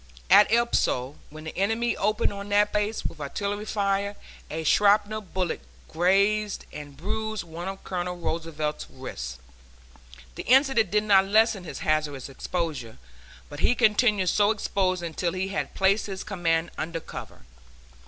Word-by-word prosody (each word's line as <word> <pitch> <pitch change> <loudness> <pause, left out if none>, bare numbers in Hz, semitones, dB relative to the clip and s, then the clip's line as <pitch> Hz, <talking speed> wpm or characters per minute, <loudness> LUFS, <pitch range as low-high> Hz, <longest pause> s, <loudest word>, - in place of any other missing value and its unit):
At 210 - +7
El 235 +1 +4
Poso, 130 - 0
when 155 +1 -10
the 160 - -7
enemy 225 +5 +1
opened 210 +1 +1
on 200 0 -7
that 205 +1 +3
place 210 +1 -1
with 155 - -5
artillery 200 +8 -3
fire, 200 -1 0 0.3
a 160 +1 -4
shrapnel 210 +4 +3
bullet 185 -3 -3 0.3
grazed 200 +5 +2
and 145 -2 -9
bruised 220 +5 -3
one 170 +2 -7
of 195 0 -6
Colonel 180 -1 -3
Roosevelt's 160 -3 -3
wrists. 60 - -7 1.0
The - - -6
incident 265 -5 +4
did 210 +2 +2
not 195 -2 +5
lessen 215 -2 +3
his - - -7
hazardous 155 -4 0
exposure, 135 -5 -4 0.5
but 145 - -9
he 245 - +3
continued 210 -4 +3
so 205 +3 +3
exposed 190 -4 0
until 170 +1 -2
he 190 +1 -2
had 195 - -3
placed 195 +3 +2
his 190 -1 -5
command 170 -5 0
under 165 +1 -3
cover. - - -10
195 Hz, 150 wpm, -26 LUFS, 165-210 Hz, 1.0 s, At